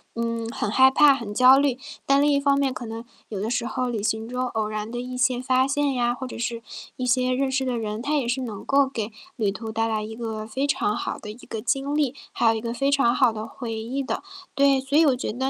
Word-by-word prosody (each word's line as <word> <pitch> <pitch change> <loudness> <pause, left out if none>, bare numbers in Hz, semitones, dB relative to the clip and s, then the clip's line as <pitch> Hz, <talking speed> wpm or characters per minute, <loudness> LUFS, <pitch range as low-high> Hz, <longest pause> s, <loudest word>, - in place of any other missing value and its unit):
嗯， 230 -1 -2
很 210 - -3
害 260 +5 +6
怕、 290 +1 +6
很 230 -6 -6
焦 255 +4 +7
虑。 275 -3 +2 0.3
但 275 0 +4
另 295 - +4
一 - - +3
方 280 0 +2
面， 270 -2 +1
可 245 - -7
能， 225 +1 -7 0.2
有 205 - -4
的 210 +3 -2
时 245 0 -1
候 255 +2 -2
旅 225 -4 -3
行 220 +1 -1
中 250 +1 -2
偶 225 -3 -2
然 215 +1 -4
的 240 - -4
一 250 +1 -5
些 250 -1 +1
发 255 0 +2
现 280 0 0
呀， 240 -1 +1
或 260 +1 -6
者 - - -8
是 235 0 -3 0.4
一 255 - -2
些 255 0 +2
认 265 +1 +1
识 265 0 0
的 255 -2 -1
人， 215 -1 -3
他 300 +4 0
也 265 -5 -1
是 250 +2 -1
能 220 -6 -6
够 275 0 +3
给 225 -4 -4 0.3
旅 210 -4 +1
途 220 +1 -6
带 225 +1 0
来 215 -1 -1
一 220 +1 -7
个 220 -2 -4
非 265 +6 -2
常 265 -7 +1
好 - - -3
的 210 - -8
一 215 - -12
个 220 - -5
经 275 +3 -1
历， 290 -4 +1 0.2
还 235 - 0
有 - - +4
一 220 - -2
个 230 +1 -4
非 275 +3 0
常 275 -4 +3
好 250 -4 +4
的 220 0 -6
回 235 -3 -6
忆 235 +5 -3
的。 265 - -3 0.3
对， 275 -1 +3
所 270 +2 0
以 325 - +6
我 275 -4 +4
觉 250 - -3
得 260 +4 -1
245 Hz, 290 characters per minute, -24 LUFS, 225-270 Hz, 0.4 s, 焦